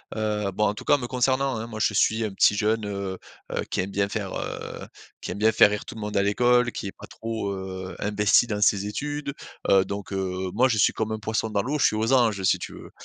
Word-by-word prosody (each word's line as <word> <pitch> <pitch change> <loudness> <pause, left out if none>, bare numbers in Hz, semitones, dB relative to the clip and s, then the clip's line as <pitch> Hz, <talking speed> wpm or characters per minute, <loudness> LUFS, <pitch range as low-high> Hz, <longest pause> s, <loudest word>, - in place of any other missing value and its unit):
heu, 105 -2 -1
bon, 105 - +1
en 105 - +1
tout - - -9
cas - - +5
me 125 -3 -5
concernant 130 +1 +1
hein, 115 +1 -5
moi 110 -2 -7
je 105 - +2
suis 110 +2 +2
un 105 - -3
petit 100 - +4
jeune, 110 +1 0
heu 100 -2 -4 0.3
heu, - - -1
qui - - +1
aime 95 +1 -5
bien 100 0 0
faire, 100 -2 -4
heu, - - -6 0.3
qui - - -5
aime 95 - -5
bien 110 +1 +4
faire 105 - +6
rire 105 -1 -3
tout - - -9
le 110 - -7
monde 105 -1 -3
à 100 - +3
l'école, 125 +4 +3
qui 100 - -5
est - - -5
pas - - -13
trop, 110 -3 -4
heu, 95 -1 -6
investi 105 +3 +3
dans 105 -3 -3
ses 100 -1 +3
études, 145 +5 -4 0.4
heu, 95 -1 +5
donc, 100 0 -6
heu, 95 -1 -2
moi 125 +5 +4
je 115 - 0
suis 105 - +4
comme 110 0 -2
un 110 - -3
poisson 110 +1 -1
dans 105 -2 0
l'eau, 145 +7 -2
je - - +4
suis 110 - +3
aux 110 +4 +1
anges 110 -7 +3
si - - +3
tu - - -7
veux. - - -11
105 Hz, 265 wpm, -25 LUFS, 100-115 Hz, 0.4 s, faire